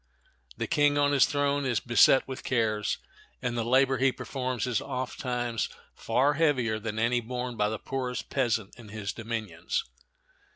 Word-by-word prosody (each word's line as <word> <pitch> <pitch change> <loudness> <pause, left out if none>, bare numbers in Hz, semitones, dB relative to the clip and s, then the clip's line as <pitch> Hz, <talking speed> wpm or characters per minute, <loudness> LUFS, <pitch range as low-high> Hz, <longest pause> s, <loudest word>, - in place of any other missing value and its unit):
The - - -1
king 145 0 +3
on 145 0 +3
his 140 -2 +5
throne 145 0 +1
is 125 -4 +1
beset 120 +3 +5
with 130 -1 -6
cares, 110 -4 0 0.4
and 125 -1 -2
the 115 - 0
labor 130 +2 +3
he 135 0 +4
performs 130 -2 -3
is 125 -4 0
ofttimes 125 -3 -2 0.2
far 140 +3 +1
heavier 130 -8 +1
than 110 0 -4
any 120 +2 +2
borne 125 +1 -4
by 105 -1 +1
the 110 - -3
poorest 125 +1 -4
peasant 115 -6 0
in 110 -3 -12
his 105 -1 -4
dominions. 110 -7 -3
125 Hz, 160 wpm, -28 LUFS, 115-135 Hz, 0.4 s, his